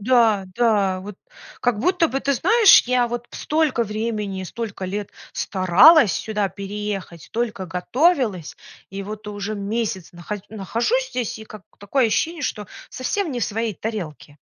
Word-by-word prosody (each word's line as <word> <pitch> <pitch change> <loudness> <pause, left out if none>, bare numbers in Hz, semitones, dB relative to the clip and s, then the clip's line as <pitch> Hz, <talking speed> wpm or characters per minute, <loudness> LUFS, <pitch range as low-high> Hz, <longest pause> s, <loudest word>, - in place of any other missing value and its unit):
Да, 225 -3 +3
да, 205 -6 +2
вот, 200 +1 -9 0.4
как 245 -4 +1
будто 340 - +2
бы, 270 - -1
ты 280 - +1
знаешь, 410 - +6
я 250 -1 +2
вот 240 0 -5
столько 300 -6 0
времени, 210 -3 -3
столько 200 0 -6
лет 200 +2 -4 0.2
старалась 195 - +5
сюда 210 0 -1
переехать, 200 -4 -6
столько 220 -5 -3
готовилась, 210 - 0 0.3
и 195 +1 -5
вот 210 +1 -7
уже 205 +1 -4
месяц 200 -3 -3
наха 175 +4 -6
нахожусь 230 - -1
здесь, 240 -3 -3
и 220 - -9
как 215 -2 -12 0.2
такое 235 +5 +1
ощущение, 320 +9 -1
что 210 -6 -3 0.2
совсем 330 +8 -2
не 245 -3 -3
в - - +2
своей 225 0 -2
тарелке. 165 -9 -6
215 Hz, 150 wpm, -22 LUFS, 195-250 Hz, 0.4 s, знаешь